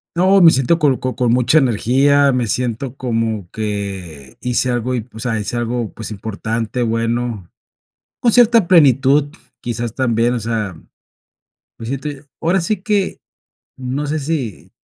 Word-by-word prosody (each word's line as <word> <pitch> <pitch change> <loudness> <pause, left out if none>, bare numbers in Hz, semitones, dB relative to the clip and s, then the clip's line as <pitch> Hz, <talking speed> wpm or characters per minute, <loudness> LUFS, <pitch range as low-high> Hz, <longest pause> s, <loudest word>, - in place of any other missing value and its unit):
No, 190 +3 +4
me 165 -2 +8
siento 135 +5 +2
con 145 -5 +2
con 130 0 -3
con 125 -2 0
mucha 125 +6 +4
energía, 135 +3 +3
me 125 -1 0
siento 125 +3 -2
como 115 -6 -2
que 95 -10 -5
hice 125 +1 0
algo, 120 +1 -1
y, 125 - 0
pues, 110 +1 -8
o - - 0
sea, 110 -1 -1
hice 105 +3 -4
algo, 120 -1 -2
pues, 110 - -7
importante, 110 +3 -3
bueno, 115 -3 -2 0.7
con 235 -3 +2
cierta 230 -5 +5
plenitud, 145 -3 +4 0.3
quizás, 120 -1 -4
también, 120 -2 +1
o 125 - -1
sea, 110 -4 -3 1.0
me 115 - -8
siento 135 +4 -4 0.3
ahora 175 +4 +1
sí 190 +6 0
que, 200 -1 -1 0.6
no 130 +3 -3
sé 155 +2 -1
si 140 - -4
125 Hz, 155 wpm, -18 LUFS, 115-140 Hz, 1.0 s, me